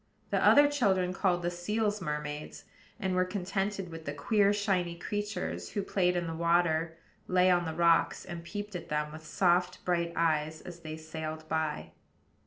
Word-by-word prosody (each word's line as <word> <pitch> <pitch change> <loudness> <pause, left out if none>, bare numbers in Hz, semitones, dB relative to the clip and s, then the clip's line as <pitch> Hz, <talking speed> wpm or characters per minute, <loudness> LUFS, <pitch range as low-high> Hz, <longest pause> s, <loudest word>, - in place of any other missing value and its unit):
The - - +2
other 290 0 +7
children 190 -11 +1
called 180 -2 +1
the 175 - 0
seals 210 +4 -1
mermaids; 150 -2 -4 0.4
and 190 -3 -1
were 185 0 +3
contented 195 0 -2
with 165 -1 -8
the 145 - -3
queer, 200 +7 +3
shiny 195 -4 0
creatures 205 +2 -4
who 200 - -1
played 180 -2 +1
in 175 -1 0
the 165 - -4
water, 165 -1 +1 0.3
lay 185 0 +4
on 175 -1 +3
the 160 -1 -4
rocks, 170 -1 +3
and 170 -1 -7
peeped 205 +2 -6
at 175 - -6
them 150 0 -1
with 155 +1 -10
soft, 180 +2 +1
bright 170 -1 +1
eyes 155 -1 +1
as 175 -1 -9
they 155 -1 -7
sailed 155 0 -6
by. 160 -1 -2
175 Hz, 175 wpm, -30 LUFS, 160-190 Hz, 0.4 s, other